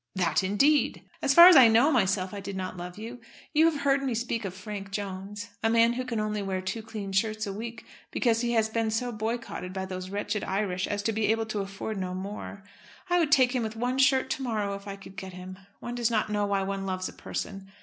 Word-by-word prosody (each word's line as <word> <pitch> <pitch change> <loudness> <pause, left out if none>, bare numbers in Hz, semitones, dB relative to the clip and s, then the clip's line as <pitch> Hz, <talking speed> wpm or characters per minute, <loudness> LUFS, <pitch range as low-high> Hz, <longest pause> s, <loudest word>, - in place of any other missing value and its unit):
"That, 180 0 +1
indeed!" 275 +11 +2 0.2
"As 270 - +2
far 340 +1 +12
as 365 - +9
I 260 -4 +9
know 230 +7 +5
myself, 195 -6 +1
I 205 - -5
did 200 0 -6
not 185 0 -4
love 180 +1 -7
you. 230 +3 -7 0.3
You 315 +2 +5
have 295 -3 -4
heard 275 -1 +3
me 265 -4 -1
speak 230 -1 -2
of 185 -1 -5
Frank 200 0 -7
Jones, 200 +1 -5
a 225 - +2
man 230 +1 +4
who 255 +1 -2
can 240 -3 -3
only 210 -1 -1
wear 190 -1 -2
two 190 +5 -4
clean 215 -3 -6
shirts 215 +2 0
a 200 - -4
week 230 +3 -7 0.2
because 230 -2 +1
he 240 -1 0
has 220 -2 +3
been 225 0 -1
so 240 +3 -1
boycotted 220 -4 -4
by 190 0 -3
those 185 0 -6
wretched 205 +1 -2
Irish 190 -2 -1
as 205 0 -2
to 225 - +1
be 215 -1 0
able 225 +1 +1
to 215 -1 -3
afford 195 +1 -4
no 185 -1 -3
more. 200 +1 -6 0.5
I 355 - +4
would 315 -3 +1
take 260 -4 +5
him 250 - 0
with 220 -1 -3
one 250 +3 -1
shirt 265 0 +3
to - - -2
morrow, 215 -5 -1
if 200 +1 -8
I 200 - -5
could 195 -1 -13
get 190 -4 -7
him. 185 +1 -9 0.2
One 240 - -5
does 240 -1 +1
not 215 -2 0
know 205 -1 +1
why 200 -1 +1
one 195 0 -3
loves 185 0 -2
a - - -9
person. 195 -1 -6
210 Hz, 245 wpm, -28 LUFS, 195-235 Hz, 0.5 s, far